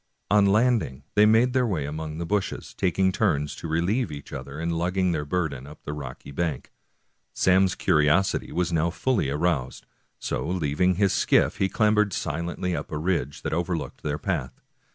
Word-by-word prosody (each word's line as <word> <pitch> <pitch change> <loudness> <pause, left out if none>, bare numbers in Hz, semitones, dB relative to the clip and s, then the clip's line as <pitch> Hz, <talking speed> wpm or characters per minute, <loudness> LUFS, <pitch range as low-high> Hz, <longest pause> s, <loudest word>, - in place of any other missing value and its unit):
On 105 -1 +5
landing 105 - +2
they 105 +1 +6
made 115 +3 +4
their 130 -2 +2
way 85 -10 -1
among 75 +1 -5
the 85 - -3
bushes, 100 +2 -2
taking 95 +1 +1
turns 75 -8 0
to - - -6
relieve 85 +7 0
each 70 -1 -9
other 70 +2 -7
in 85 +1 -1
lugging 90 +2 0
their 75 -3 -2
burden 75 -5 -2
up 75 +1 -13
the 75 - -5
rocky 70 -2 -8
bank. 75 -2 -3 0.6
Sam's 95 0 +3
curiosity 75 +6 +2
was 90 -1 -1
now 80 +1 +2
fully 90 - 0
aroused, 75 -3 -1 0.3
so - - -3
leaving 90 +1 +1
his 100 +1 +2
skiff - - +2
he 95 - +1
clambered 105 -2 +2
silently 85 +3 -2
up - - -5
a 75 - -2
ridge 80 -4 -2
that - - -2
over 85 +1 0
looked 75 -5 -7
their 75 -1 -2
path. 75 -8 -3
85 Hz, 175 wpm, -25 LUFS, 75-95 Hz, 0.6 s, they